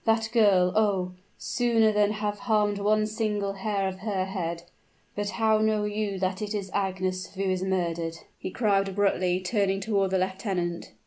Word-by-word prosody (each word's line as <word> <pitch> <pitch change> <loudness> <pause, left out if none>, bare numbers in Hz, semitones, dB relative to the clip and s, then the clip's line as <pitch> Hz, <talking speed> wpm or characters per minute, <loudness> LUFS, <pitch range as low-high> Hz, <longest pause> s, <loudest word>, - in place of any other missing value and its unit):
"That 225 0 +2
girl 195 -6 +4
oh! 195 -4 +2 0.3
sooner 230 -3 +2
than 210 0 +2
have 210 -1 -3
harmed 210 -4 +1
one 215 +1 +2
single 210 -2 -1
hair 195 0 -1
of 190 0 -5
her 195 -2 -1
head 170 -3 -4 0.5
But 205 0 -2
how 215 +2 +2
know 215 -1 +2
you 210 -1 -2
that 185 +1 -1
it 210 0 -3
is 195 -2 -4
Agnes 185 -1 -2
who 195 - -2
is 185 -1 0
murdered?" 170 -3 -1 0.2
he - - -4
cried 195 -2 +1
abruptly, 185 -2 +1
turning 195 0 0
toward 195 -1 +1
the 190 - +1
lieutenant. 185 -2 -2
200 Hz, 170 wpm, -27 LUFS, 185-215 Hz, 0.5 s, girl